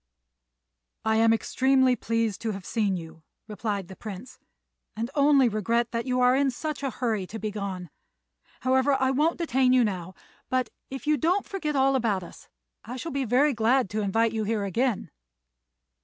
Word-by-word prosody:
"I 220 0 +2
am 225 0 +5
extremely 260 +3 +3
pleased 230 -4 -1
to 225 -2 -2
have 195 -2 -8
seen 205 -3 0
you," 165 -1 -10 0.3
replied 205 -2 -3
the 190 - -10
Prince, 210 +3 -9 0.6
"and 230 +4 -3
only 280 -3 +5
regret 230 +2 0
that 230 +1 -3
you 250 0 +1
are 250 +1 +5
in 275 0 +2
such 300 +3 -4
a 275 - -1
hurry 225 -7 -2
to 220 - -7
be 215 -1 -3
gone. 195 -5 -5 0.7
However, 260 +2 +3
I 265 0 +2
won't 305 +5 +1
detain 265 -6 +2
you 255 -1 +5
now; 185 -4 -3 0.3
but, 255 -4 0 0.2
if 270 +2 -7
you 300 0 +3
don't 355 +9 +1
forget 310 -7 -3
all 270 0 +3
about 215 -7 0
us, - - -13 0.3
I 245 - -7
shall 330 +6 -5
be 275 -1 -1
very 265 +5 +3
glad 235 0 +2
to 215 +1 -1
invite 225 +3 +1
you 220 -1 -2
here 210 -1 -1
again." 225 +4 -1
235 Hz, 180 wpm, -26 LUFS, 210-265 Hz, 0.7 s, am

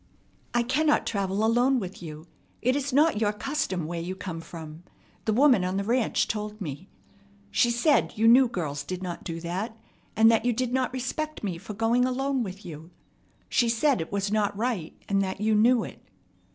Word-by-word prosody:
"I 240 - +3
cannot 295 +5 +2
travel 200 0 0
alone 245 +3 +3
with 190 -3 -7
you. 155 -1 -8 0.4
It 255 +2 +3
is 285 0 -1
not 290 -4 +3
your 210 -1 +3
custom 210 - -2
where 170 +1 -4
you 180 +3 -4
come 175 -3 -6
from. 160 -1 -10 0.4
The 220 - +1
woman 250 -5 +5
on 185 +1 -1
the 200 - 0
ranch 235 +3 +1
told 210 0 -4
me. 160 0 -6 0.6
She 240 - +3
said 240 +6 +2
you 225 +1 +3
knew 250 +3 +7
girls 155 -10 -3
did 185 +5 -5
not 175 -2 -5
do 165 -1 -5
that, 190 +7 -4 0.4
and 225 +1 +6
that 225 -1 +2
you 245 0 +2
did 250 +1 -2
not 260 -1 +1
respect 260 +4 -4
me 180 -5 -3
for 210 - -8
going 230 +3 +2
alone 265 +1 0
with 195 -2 -6
you. 160 0 -9 0.6
She 240 -2 +2
said 235 - +2
it 160 - -6
was 200 0 -1
not 205 -2 0
right, 220 -8 -2
and 195 -1 +2
that 190 0 -3
you 215 +1 +2
knew 230 +3 +4
it." - - -10
215 Hz, 195 wpm, -27 LUFS, 185-250 Hz, 0.6 s, knew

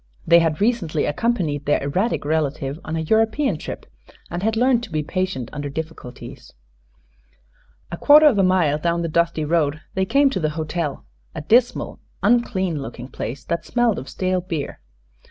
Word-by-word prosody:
They 170 +1 +7
had 165 -2 0
recently 205 -9 +1
accompanied 155 - -1
their 145 - +2
erratic 180 +7 -1
relative 150 -1 -1
on 160 - -4
a 160 - -1
European 220 - +1
trip - - -7 0.5
and 175 +1 -3
had 220 +2 0
learned 245 +1 +3
to 240 - -9
be 155 -1 -1
patient 185 -7 -3
under 145 -1 -4
difficulties. 155 -4 -8 1.4
A 170 - -4
quarter 300 - +7
of 255 -9 +5
a - - +4
mile 175 -6 +2
down 170 +1 0
the - - -1
dusty 170 -1 0
road 155 -2 +1
they 190 0 0
came 275 +5 +3
to 190 - -2
the 155 -3 0
hotel, 155 - -3 0.3
a - - -4
dismal, 235 +10 +2 0.2
unclean 190 -8 +1
looking 125 -1 -8
place 130 +1 -6
that 170 0 -2
smelled 240 -3 +1
of 130 - -9
stale 185 -1 -1
beer. 165 -5 -5
170 Hz, 170 wpm, -22 LUFS, 150-210 Hz, 1.4 s, They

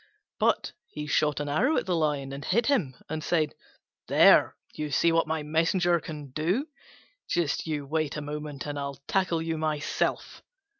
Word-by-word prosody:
But - - +2 0.2
he 150 - -6
shot 150 -1 +1
an 145 - -3
arrow 250 - +2
at - - 0
the 180 -2 0
Lion 145 -4 0
and 140 +1 -6
hit 230 +5 +1
him, 195 - +1
and 155 0 -4
said, 155 -4 +1 0.5
"There, - - +6 0.2
you 150 -1 -4
see 165 +3 +3
what 165 -1 +2
my 160 -1 -1
messenger 170 +3 +2
can 150 -3 -8
do: 180 - 0 0.6
just 170 -2 0
you 150 -3 -2
wait 155 0 -1
a - - -3
moment 150 -1 -5
and 145 -1 -4
I'll 140 -1 -5
tackle 175 -4 +1
you 165 -1 -2
myself." 155 -2 -1
155 Hz, 170 wpm, -28 LUFS, 145-170 Hz, 0.6 s, There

